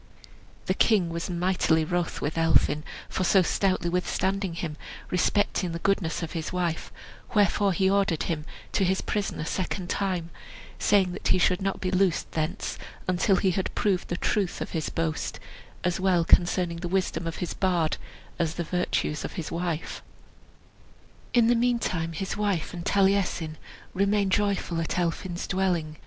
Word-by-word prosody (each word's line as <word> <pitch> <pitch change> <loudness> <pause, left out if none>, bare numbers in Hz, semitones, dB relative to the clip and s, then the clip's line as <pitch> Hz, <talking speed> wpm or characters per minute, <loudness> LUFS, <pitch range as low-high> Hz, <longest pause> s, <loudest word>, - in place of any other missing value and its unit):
The - - +1
king 200 -7 +3
was 170 +2 -3
mightily 175 -2 +2
wroth 175 +1 -1
with 150 - -2
Elphin 165 -2 +3 0.2
for 185 - -2
so 185 +1 +5
stoutly 185 -1 +1
withstanding 190 +1 0
him, 165 -3 -4 0.4
respecting 180 -1 +1
the - - -2
goodness 180 -2 0
of 165 - -4
his 160 -2 -4
wife; 175 -3 -2 0.4
wherefore 205 -1 +4
he 190 +2 +2
ordered 195 -4 +2
him 155 -2 -2 0.3
to 195 - +2
his 190 +1 +2
prison 205 -2 -2
a 155 - -2
second 185 +1 -2
time, 180 -4 -1 0.5
saying 195 -3 +3
that 180 - -4
he - - +4
should 180 +1 +2
not 195 0 -1
be 185 - -1
loosed 185 -3 +1
thence 155 +1 -2 0.3
until 185 +2 +3
he 185 0 +2
had 185 +1 -2
proved 190 -4 +1
the 175 - -2
truth 195 -2 0
of - - -4
his 160 -3 -2
boast, 160 -1 -2 0.4
as 180 0 0
well 185 -3 +3
concerning 175 -1 +3
the 175 +1 -4
wisdom 180 -2 -1
of 165 - -3
his 175 - -3
bard 175 -5 +1 0.4
as 165 -1 0
the 170 - -2
virtues 175 -3 -1
of - - -5
his 165 - -5
wife. 170 -2 -3 1.3
In 240 -2 +5
the 240 - +5
meantime 230 -9 0
his 190 +4 -3
wife 205 -6 -1
and 175 -1 -5
Taliesin 190 -5 +2 0.4
remained 200 0 +2
joyful 195 -4 +1
at 165 - -2
Elphin's 175 +1 -2
dwelling. 175 -5 0
180 Hz, 165 wpm, -27 LUFS, 165-195 Hz, 1.3 s, so